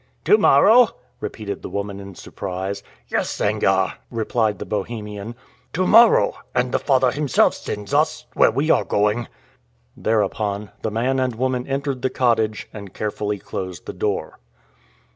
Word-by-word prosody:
"To 425 Hz, -, +7 dB
morrow?" 245 Hz, -, +5 dB, 0.2 s
repeated 100 Hz, -3 st, -5 dB
the -, -, -7 dB
woman 100 Hz, -1 st, -4 dB
in 100 Hz, -1 st, -10 dB
surprise. 95 Hz, +2 st, -5 dB, 0.3 s
"Yes, -, -, -1 dB
Sangarre," 95 Hz, -3 st, +1 dB
replied 110 Hz, -2 st, 0 dB
the -, -, -6 dB
Bohemian; 105 Hz, +1 st, -5 dB, 0.4 s
"to 185 Hz, +2 st, +1 dB
morrow, 230 Hz, +4 st, +6 dB, 0.2 s
and 125 Hz, 0 st, +1 dB
the -, -, +1 dB
Father 130 Hz, -3 st, +3 dB
himself 145 Hz, -1 st, +2 dB
sends 105 Hz, +5 st, -6 dB
us 155 Hz, -1 st, +1 dB
where -, -, +5 dB
we 140 Hz, +8 st, +1 dB
are -, -, +3 dB
going!" 105 Hz, +3 st, 0 dB, 0.7 s
Thereupon 105 Hz, -2 st, -1 dB
the 110 Hz, -, -1 dB
man 125 Hz, +5 st, 0 dB
and 130 Hz, -2 st, 0 dB
woman 130 Hz, +1 st, -1 dB
entered 135 Hz, -1 st, -2 dB
the 130 Hz, -, +1 dB
cottage, 115 Hz, -4 st, 0 dB
and 100 Hz, -3 st, -10 dB
carefully 105 Hz, -1 st, -2 dB
closed 95 Hz, -3 st, -6 dB
the -, -, -6 dB
door. -, -, -3 dB
110 Hz, 145 wpm, -22 LUFS, 100-130 Hz, 0.7 s, To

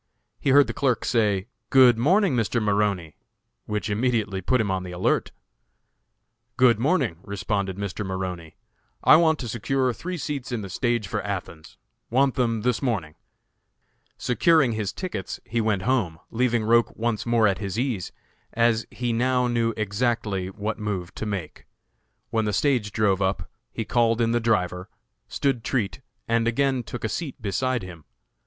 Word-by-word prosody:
He -, -, -1 dB
heard 140 Hz, +1 st, +7 dB
the -, -, -5 dB
clerk 130 Hz, -4 st, 0 dB
say, 105 Hz, -5 st, +1 dB, 0.2 s
"Good 130 Hz, -3 st, +7 dB
morning, 175 Hz, -, +3 dB
Mr. 120 Hz, 0 st, +1 dB
Maroney," 100 Hz, -6 st, 0 dB, 0.5 s
which 105 Hz, 0 st, -2 dB
immediately 105 Hz, -3 st, 0 dB
put 125 Hz, +7 st, +1 dB
him 105 Hz, -3 st, 0 dB
on 95 Hz, -1 st, -1 dB
the 90 Hz, -1 st, -7 dB
alert. 90 Hz, +1 st, 0 dB, 1.3 s
"Good 125 Hz, -4 st, +5 dB
morning," 130 Hz, -, +1 dB
responded 100 Hz, -1 st, -3 dB
Mr. 100 Hz, 0 st, -4 dB
Maroney. 95 Hz, -4 st, -5 dB, 0.5 s
"I -, -, +8 dB
want 160 Hz, -1 st, +3 dB
to 125 Hz, -, -5 dB
secure 125 Hz, +3 st, 0 dB
three 180 Hz, -, -5 dB
seats 140 Hz, -3 st, -4 dB
in 120 Hz, -3 st, -2 dB
the 95 Hz, -, -7 dB
stage 120 Hz, -1 st, 0 dB
for -, -, -2 dB
Athens; 95 Hz, -5 st, -6 dB, 0.3 s
want 135 Hz, +2 st, +3 dB
them 115 Hz, -3 st, 0 dB
this 125 Hz, -2 st, +1 dB
morning." 105 Hz, -, -1 dB, 1.0 s
Securing 145 Hz, +1 st, +3 dB
his 110 Hz, -3 st, -2 dB
tickets, 175 Hz, -, -5 dB
he 115 Hz, +1 st, -1 dB
went 105 Hz, -4 st, 0 dB
home, 110 Hz, -9 st, 0 dB
leaving 120 Hz, -1 st, +1 dB
Roch 115 Hz, +2 st, +3 dB
once 115 Hz, 0 st, -1 dB
more 115 Hz, -2 st, +4 dB
at 95 Hz, -2 st, 0 dB
his 100 Hz, 0 st, -4 dB
ease, 120 Hz, -7 st, -2 dB, 0.4 s
as 115 Hz, -1 st, +2 dB
he 120 Hz, -1 st, -2 dB
now 125 Hz, +2 st, +2 dB
knew 115 Hz, -1 st, +1 dB
exactly 105 Hz, -2 st, -1 dB
what 105 Hz, +3 st, -4 dB
move 95 Hz, -4 st, -3 dB
to 110 Hz, -, -5 dB
make. 95 Hz, -7 st, -5 dB, 0.6 s
When 110 Hz, -1 st, +1 dB
the 105 Hz, -, -1 dB
stage 120 Hz, -5 st, +1 dB
drove 100 Hz, -2 st, +1 dB
up, 95 Hz, -4 st, -1 dB, 0.2 s
he 115 Hz, -, -4 dB
called 115 Hz, -1 st, +2 dB
in 115 Hz, -1 st, +2 dB
the 120 Hz, -, +2 dB
driver, 90 Hz, -6 st, 0 dB, 0.4 s
stood 135 Hz, -5 st, -1 dB
treat, 120 Hz, -1 st, -2 dB, 0.3 s
and 115 Hz, 0 st, +1 dB
again 130 Hz, +2 st, +1 dB
took 120 Hz, +1 st, -7 dB
a -, -, +1 dB
seat 145 Hz, +2 st, -4 dB
beside 120 Hz, +3 st, -1 dB
him. 85 Hz, -5 st, -10 dB
115 Hz, 160 wpm, -25 LUFS, 100-125 Hz, 1.3 s, I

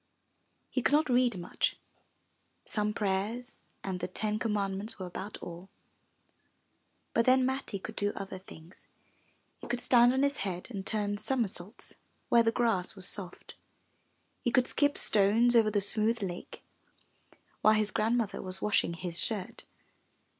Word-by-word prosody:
He 255 Hz, -, 0 dB
could 280 Hz, -, +1 dB
not 300 Hz, -1 st, +3 dB
read 245 Hz, -4 st, +3 dB
much 175 Hz, 0 st, -1 dB, 0.4 s
— -, -, -44 dB, 0.2 s
some 210 Hz, -1 st, -1 dB
prayers 210 Hz, +4 st, -2 dB, 0.2 s
and 190 Hz, -2 st, -3 dB
the -, -, -3 dB
ten 210 Hz, +3 st, -2 dB
com 225 Hz, -2 st, -1 dB
mandments 200 Hz, +2 st, -2 dB
were 185 Hz, -, -5 dB
about 190 Hz, +3 st, -7 dB
all. 175 Hz, +2 st, -9 dB, 1.4 s
But 230 Hz, -, +2 dB
then 255 Hz, 0 st, +5 dB
Matti 265 Hz, -5 st, -2 dB
could 215 Hz, +3 st, -8 dB
do 205 Hz, 0 st, +1 dB
other 195 Hz, -1 st, -6 dB
things. 170 Hz, -1 st, -15 dB, 0.7 s
He -, -, -9 dB
could 240 Hz, 0 st, -2 dB
stand 245 Hz, -1 st, +6 dB
on 265 Hz, +2 st, +1 dB
his 280 Hz, 0 st, +2 dB
head 185 Hz, 0 st, -4 dB
and 200 Hz, -4 st, -5 dB
turn 205 Hz, -1 st, -1 dB
somersaults 220 Hz, -5 st, -3 dB, 0.4 s
where 235 Hz, -, +6 dB
the 225 Hz, 0 st, +2 dB
grass 225 Hz, -6 st, 0 dB
was 190 Hz, -1 st, -5 dB
soft. 185 Hz, -4 st, -5 dB, 0.9 s
He -, -, 0 dB
could 255 Hz, 0 st, +3 dB
skip 290 Hz, +2 st, +1 dB
stones 220 Hz, +4 st, +4 dB
over 225 Hz, -2 st, +5 dB
the 210 Hz, -1 st, +1 dB
smooth 215 Hz, +2 st, 0 dB
lake, 175 Hz, -2 st, -6 dB, 1.0 s
while 215 Hz, 0 st, +5 dB
his 215 Hz, -1 st, +2 dB
grandmother 220 Hz, -2 st, 0 dB
was 185 Hz, 0 st, -5 dB
washing 205 Hz, -4 st, +1 dB
his 175 Hz, -1 st, +1 dB
shirt. 205 Hz, -5 st, -2 dB
210 Hz, 155 wpm, -30 LUFS, 190-240 Hz, 1.4 s, stand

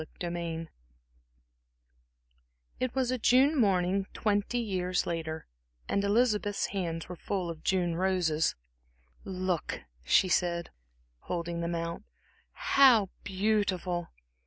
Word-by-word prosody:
Chapter 170 Hz, +2 st, -6 dB
II 165 Hz, -1 st, -4 dB, 2.1 s
It 255 Hz, 0 st, -2 dB
was 255 Hz, -2 st, +1 dB
a 255 Hz, -, -1 dB
June 260 Hz, +7 st, +5 dB
morning 195 Hz, -5 st, +2 dB
twenty 205 Hz, +2 st, 0 dB
years 185 Hz, -6 st, 0 dB
later, 160 Hz, -2 st, -3 dB, 0.4 s
and 200 Hz, -, 0 dB
Elizabeth's 210 Hz, -1 st, +2 dB
hands 170 Hz, -4 st, -3 dB
were 180 Hz, -, -6 dB
full 180 Hz, 0 st, -3 dB
of 160 Hz, -1 st, -10 dB
June 175 Hz, -3 st, +1 dB
roses. 175 Hz, -4 st, +1 dB, 0.7 s
"Look," 185 Hz, -3 st, -2 dB, 0.2 s
she 185 Hz, -, +4 dB
said, 170 Hz, -1 st, 0 dB, 0.5 s
holding 170 Hz, -, -3 dB
them 170 Hz, 0 st, -2 dB
out 170 Hz, +2 st, -3 dB, 0.5 s
"how 240 Hz, -8 st, +5 dB
beautiful!" 190 Hz, -3 st, 0 dB
185 Hz, 110 wpm, -30 LUFS, 170-205 Hz, 2.1 s, June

